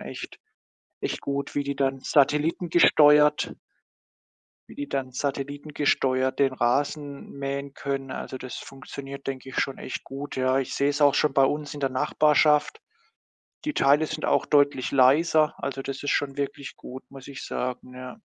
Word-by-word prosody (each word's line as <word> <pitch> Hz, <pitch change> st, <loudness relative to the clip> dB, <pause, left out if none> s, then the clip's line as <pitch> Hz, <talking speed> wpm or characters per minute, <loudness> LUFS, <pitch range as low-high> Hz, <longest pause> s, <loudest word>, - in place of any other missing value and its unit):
echt -, -, -8 dB, 0.6 s
echt -, -, -2 dB
gut. 140 Hz, 0 st, -4 dB
Wie 145 Hz, -, +1 dB
die 140 Hz, 0 st, -3 dB
dann 135 Hz, -1 st, 0 dB
satellitengesteuert 150 Hz, +1 st, +4 dB, 1.1 s
wie -, -, -12 dB
die 145 Hz, 0 st, -5 dB
dann 130 Hz, -2 st, -3 dB
satellitengesteuert 140 Hz, -1 st, -1 dB
den 135 Hz, -2 st, +3 dB
Rasen 140 Hz, +3 st, -1 dB
mähen 140 Hz, 0 st, -5 dB
können, 135 Hz, -1 st, -4 dB
also, 130 Hz, -, -6 dB
das 130 Hz, -1 st, -8 dB
funktioniert, 140 Hz, 0 st, -9 dB
denke 135 Hz, 0 st, -5 dB
ich, -, -, -9 dB
schon 135 Hz, -, -1 dB
echt -, -, -6 dB
gut, 140 Hz, +2 st, -7 dB
ja. 130 Hz, +1 st, +2 dB
Ich 135 Hz, -, -4 dB
sehe 140 Hz, +1 st, +2 dB
es 145 Hz, +1 st, -2 dB
auch 145 Hz, 0 st, +5 dB
schon 150 Hz, -3 st, +2 dB
bei 135 Hz, -1 st, +5 dB
uns 145 Hz, +1 st, -2 dB
in 145 Hz, -, -8 dB
der 135 Hz, -, 0 dB
Nachbarschaft. 150 Hz, +2 st, +2 dB, 0.8 s
Die 300 Hz, -, -2 dB
Teile 145 Hz, +3 st, +4 dB
sind 155 Hz, 0 st, -5 dB
auch -, -, +2 dB
deutlich 145 Hz, -3 st, +2 dB
leiser. 150 Hz, +4 st, +4 dB
Also, 135 Hz, 0 st, -4 dB
das 135 Hz, 0 st, -6 dB
ist 145 Hz, -, -1 dB
schon 140 Hz, -1 st, 0 dB
wirklich 140 Hz, -1 st, -5 dB
gut, 130 Hz, +1 st, -10 dB
muss 135 Hz, -1 st, -12 dB
ich 135 Hz, -2 st, -8 dB
sagen, 125 Hz, 0 st, -4 dB
ja. 130 Hz, +8 st, -8 dB
140 Hz, 165 wpm, -25 LUFS, 135-145 Hz, 1.1 s, auch